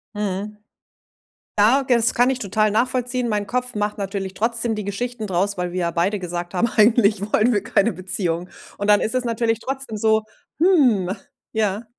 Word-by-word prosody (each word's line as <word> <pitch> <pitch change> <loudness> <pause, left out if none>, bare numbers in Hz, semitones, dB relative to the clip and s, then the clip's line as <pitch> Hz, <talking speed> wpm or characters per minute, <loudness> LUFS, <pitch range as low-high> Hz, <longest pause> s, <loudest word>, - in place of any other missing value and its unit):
Mhm. 210 +1 -3 1.0
Ja, 245 +7 +5
g - - -17
das 230 -1 +3
kann 245 +2 +3
ich 265 - 0
total 215 +1 +1
nachvollziehen. 250 +2 0
Mein 210 -1 -1
Kopf 250 +2 -1
macht 210 0 -2
natürlich 195 -1 -4
trotzdem 230 0 +1
die 210 - -4
Geschichten 230 +3 -4
draus, 195 +1 -1
weil 180 -1 -3
wir 185 - -3
ja 170 0 -1
beide 185 +5 0
gesagt 175 0 -5
haben: 210 +6 +1
„Eigentlich 215 -2 +4
wollen 230 +3 +4
wir 205 -1 0
keine 205 +1 +1
Beziehung.“ 180 -1 -1 0.3
Und 205 - -3
dann 205 -1 +5
ist 225 - -1
es 255 - +1
natürlich 230 -1 0
trotzdem 265 -3 -4
so: 220 0 +2 0.4
„Hm.“ 260 - +3 0.4
Ja. 210 -1 -1
215 Hz, 180 wpm, -21 LUFS, 195-235 Hz, 1.0 s, Ja